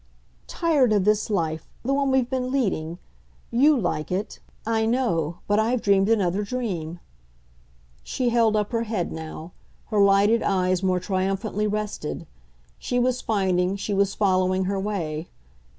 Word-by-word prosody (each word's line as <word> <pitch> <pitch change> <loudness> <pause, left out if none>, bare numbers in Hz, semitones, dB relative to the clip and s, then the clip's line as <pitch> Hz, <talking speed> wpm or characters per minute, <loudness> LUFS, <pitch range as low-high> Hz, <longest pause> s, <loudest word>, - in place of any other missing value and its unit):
"Tired 290 -9 +2
of 205 -3 +2
this 210 +1 +2
life 160 -6 -2 0.2
the 270 - +1
one 275 0 +1
we've 265 -2 +2
been 255 0 -2
leading. 185 -11 -1 0.5
You 280 +5 +4
like 175 -6 -2
it, 195 +4 -3 0.3
I 225 0 +1
know, 175 - 0
but 205 +1 +2
I've 235 +3 +1
dreamed 200 0 +3
another 200 -3 +2
dream." 195 -8 -4 1.0
She 245 - -1
held 230 -2 +3
up 210 +1 0
her 230 -1 0
head 210 -6 -2
now; 160 +1 -7 0.4
her 210 -2 +2
lighted 200 +3 +4
eyes 185 -1 +1
more 185 -1 +1
triumphantly 195 +3 -1
rested; 210 - -4 0.5
she 245 - -2
was 250 0 +1
finding, 190 -3 +1
she 200 +1 -3
was 200 0 +1
following 185 -2 +2
her 195 +1 -1
way. 170 -6 -3
200 Hz, 150 wpm, -24 LUFS, 185-230 Hz, 1.0 s, You